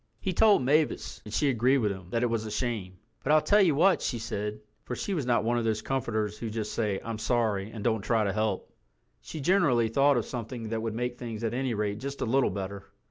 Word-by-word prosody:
He 190 - -2
told 210 -5 +5
Mavis, 140 -5 +1
and 105 - -8
she 140 +5 +2
agreed 125 +3 +3
with 105 -6 +1
him 95 -2 -8
that 115 +4 0
it 120 - +2
was 115 -1 0
a - - -4
shame. 105 -5 -3 0.2
"But 140 - 0
I'll 155 - +7
tell 205 +8 +4
you 170 -7 +4
what," 185 +5 +4
she 120 - -1
said, 105 -1 -4 0.2
for 125 - -4
she 200 - -3
was 150 -8 -2
not 120 -1 +2
one 120 +1 +1
of - - -2
those 110 -1 -1
comforters 110 -5 -2
who 115 - -4
just 110 -1 -4
say, 105 -4 0
"I'm 115 -1 -4
sorry," 110 -4 0
and 110 -2 -7
don't 110 -2 +1
try 110 +1 +1
to 100 -2 0
help. 105 -2 -2 0.5
She 155 - -7
generally 135 - +3
thought 140 +3 +4
of 120 - 0
something 115 -2 -5
that 110 0 -2
would 110 -1 -3
make 120 +1 -3
things 115 -2 -6
at 115 0 -1
any 130 -1 -1
rate 105 0 -2
just 140 +3 -6
a - - +1
little 130 +3 +2
better. 100 0 -5
115 Hz, 245 wpm, -28 LUFS, 105-130 Hz, 0.5 s, I'll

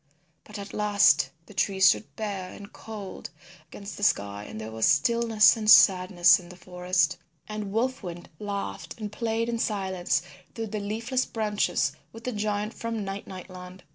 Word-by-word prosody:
But 210 - -9
at 200 0 -8
last 200 -10 +4 0.2
the - - -14
trees 190 -1 +4
stood 215 - -1
bare 195 -4 -4
and 200 0 -12
cold 210 -4 -8 0.4
against 200 0 -9
the 205 - -6
sky 100 - 0
and 110 - -8
there 110 0 -7
was 110 0 +1
stillness 225 +7 +4
and 215 -2 -2
sadness 185 -2 +7
in 175 -1 -13
the 180 - -11
forest. 180 -1 0 0.3
And 215 -2 -5
Wolf 250 +5 -1
Wind 175 -3 -8
laughed 200 +2 -5
and 210 -2 -5
played 230 +1 -1
in 235 -1 -2
silence 190 -6 -1 0.3
through 225 -1 -4
the 215 - -1
leafless 230 +5 -2
branches 210 -9 0 0.2
with 225 +1 -12
the 250 - -2
giant 210 0 -2
from 230 -3 -4
Night 195 +1 -6
Night 185 -1 -9
Land. 180 0 -11
200 Hz, 170 wpm, -27 LUFS, 180-215 Hz, 0.4 s, sadness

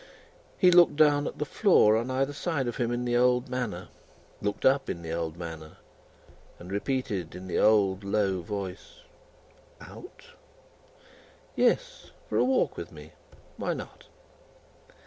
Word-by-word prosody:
He 180 -2 +5
looked 175 -3 +6
down 145 -1 +4
at - - -6
the 150 - -2
floor 140 - +4
on 115 +3 -1
either 135 +2 -1
side 145 -3 -2
of 120 - -4
him 120 -2 -1
in 120 0 -2
the 120 0 0
old 125 +1 +2
manner, 120 -8 -4 0.5
looked 105 0 -3
up 135 +1 +3
in 85 - -5
the 80 - -6
old 85 -1 -3
manner, 80 -2 -8 0.8
and 90 +2 -11
repeated 100 - -3
in 90 - -8
the 90 - -2
old 100 -3 +3
low 100 -2 0
voice: 95 +1 -7 0.8
"Out?" 365 - -13 1.3
"Yes; - - 0 0.2
for - - 0
a - - +4
walk 260 0 +1
with - - -7
me. - - -12 0.5
Why - - -2
not?" - - -10
115 Hz, 145 wpm, -27 LUFS, 95-135 Hz, 1.3 s, looked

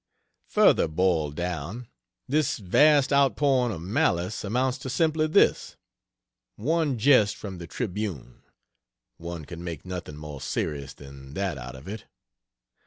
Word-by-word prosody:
Further - - +4
boiled 80 -3 0
down, 90 +7 -4 0.4
this 150 +3 +1
vast 140 +9 +4
outpouring 135 -2 +3
of 85 -5 -6
malice 90 0 0
amounts 125 +5 0
to 130 - -6
simply 155 +3 +1
this: 155 - +3 0.8
one 150 +3 0
jest 110 -4 +4
from 95 -4 -8
the 85 - -8
Tribune 100 - -5 0.8
(one 85 -2 -7
can 85 +2 -9
make 85 -3 -6
nothing 90 -5 -6
more 75 -2 -8
serious 70 -3 -3
than 70 0 -12
that 95 -7 -2
out 60 +2 -8
of 65 +5 -12
it.) 105 +3 -7
95 Hz, 130 wpm, -26 LUFS, 80-125 Hz, 0.8 s, Further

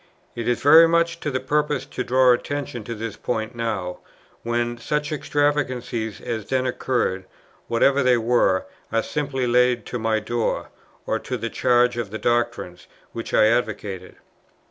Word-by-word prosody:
It 115 - -4
is 120 -1 0
very 160 +4 +8
much 170 0 +1
to 150 - -3
the 130 -2 -1
purpose 150 +1 0
to 125 - -4
draw 130 0 +4
attention 125 -2 -4
to 115 - -5
this 110 -1 -5
point 110 -1 -3
now, 110 -6 -3 0.4
when 120 0 -2
such 150 +5 -2
extravagances 130 -7 -1
as 110 -3 -5
then 130 -1 0
occurred, 120 -7 -1 0.4
whatever 135 +4 +3
they 125 -2 +4
were, 115 -5 +2 0.3
are 115 0 +1
simply 140 -3 -2
laid 125 -1 +2
to 125 - -4
my 110 -1 +1
door, 115 +1 -2 0.4
or 110 - -1
to 130 0 -4
the 115 0 -4
charge 125 -1 +2
of 115 -4 -3
the 110 - -5
doctrines 120 -7 -1 0.2
which 115 - -6
I - - +5
advocated. 105 -5 -2
120 Hz, 160 wpm, -23 LUFS, 115-130 Hz, 0.4 s, very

